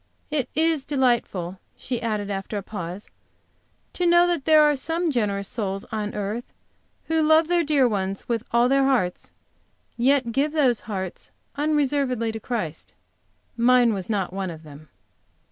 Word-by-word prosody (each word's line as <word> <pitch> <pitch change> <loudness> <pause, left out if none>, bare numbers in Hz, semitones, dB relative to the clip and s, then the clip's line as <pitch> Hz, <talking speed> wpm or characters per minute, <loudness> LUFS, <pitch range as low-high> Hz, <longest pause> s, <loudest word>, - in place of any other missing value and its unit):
It 290 -5 -1
is 320 -2 +2
delightful," 235 - 0 0.2
she 245 -3 -4
added, 210 -3 -2
after 195 +2 -4
a 200 - -4
pause, 180 -1 -6 0.9
"to 355 - 0
know 345 0 +6
that 345 -5 -1
there 310 -1 +6
are 295 -1 +4
some 330 +4 -1
generous 200 -6 -1
souls 195 -4 -3
on 210 -1 -3
earth, 210 +4 -4 0.5
who 320 0 +1
love 315 +1 +4
their 345 0 +2
dear 285 -4 +3
ones 195 -3 -3
with 230 -2 -1
all 235 +1 +3
their 275 +1 +3
hearts, 240 -10 0 0.7
yet 255 0 +2
give 285 +5 0
those 265 -7 +3
hearts 190 -3 -5 0.3
unreservedly 280 -5 0
to 220 - -6
Christ. 165 - -4 0.6
Mine 240 0 +4
was 190 -1 -5
not 195 -4 -1
one 195 -1 -3
of 160 -1 -9
them." 150 0 -13
235 Hz, 155 wpm, -24 LUFS, 200-290 Hz, 0.9 s, know